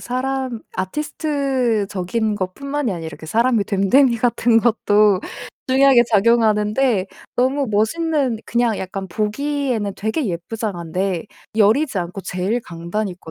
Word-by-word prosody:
사람 255 -1 -3 0.2
아티스트적인 230 - -1
것뿐만이 265 +7 -3
아니라 160 -3 -6
그 160 - -10
사람의 230 +3 +2
됨됨이 235 +6 +3
같은 235 0 +2
것도 210 -4 +3 0.5
중요하게 265 -1 +6
작용하는데 215 0 +3 0.3
너무 265 +2 +1
멋있는 265 +3 0
그냥 235 -2 +1
약간 190 +1 -5
보기에는 220 +2 -2
되게 220 +7 -1
예쁘장한데 180 -1 -3 0.3
여리지 225 +3 +3
않고 180 +2 -4
제일 185 +6 -2
강단 170 +3 -4
있고 175 -3 -10
220 Hz, 300 characters per minute, -20 LUFS, 195-255 Hz, 0.5 s, 중요하게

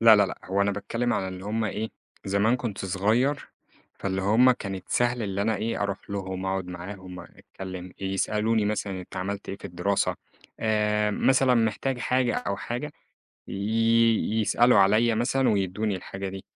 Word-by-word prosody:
لا، 115 -1 +8
لا، 100 -1 +4
لأ 95 - -7
هو 95 +1 0
أنا 100 - +2
باتكلِّم 115 +5 -2
على 95 - -1
اللي 95 0 -7
هم 110 +2 -1
إيه، 110 +1 -2 0.4
زمان 100 +5 +2
كنت 105 -6 -4
صغير، 110 +9 +1 0.5
فاللي 95 -1 -2
هم 110 +6 +5
كانت 95 -6 -4
سهل 120 0 +1
اللي 100 -1 -1
أنا 110 0 +1
إيه 115 0 -2
أروح 100 0 -4
لهم، 95 -1 -4
أقعد 95 -1 -1
معاهم 90 +1 -8
أتكلم، 95 +1 -9
يسألوني 105 +3 0
مثلًا 100 -2 -2
أنت 90 - -11
عملت 100 +2 -4
إيه 95 - -4
في - - -18
الدراسة، 90 +3 0 0.4
آآ، 105 -1 +2
مثلًا 130 +4 +3
محتاج 120 +3 0
حاجة 125 0 +1
أو 100 -5 -2
حاجة، 125 +8 -4 0.6
ي 115 +2 +2
يسألوا 120 +2 +4
عليّا 110 +4 +4
مثلًا 130 +3 +2
ويدّوني 100 +1 0
الحاجة 95 +1 -6
دي، 95 0 -8
105 Hz, 165 wpm, -26 LUFS, 95-115 Hz, 0.6 s, لا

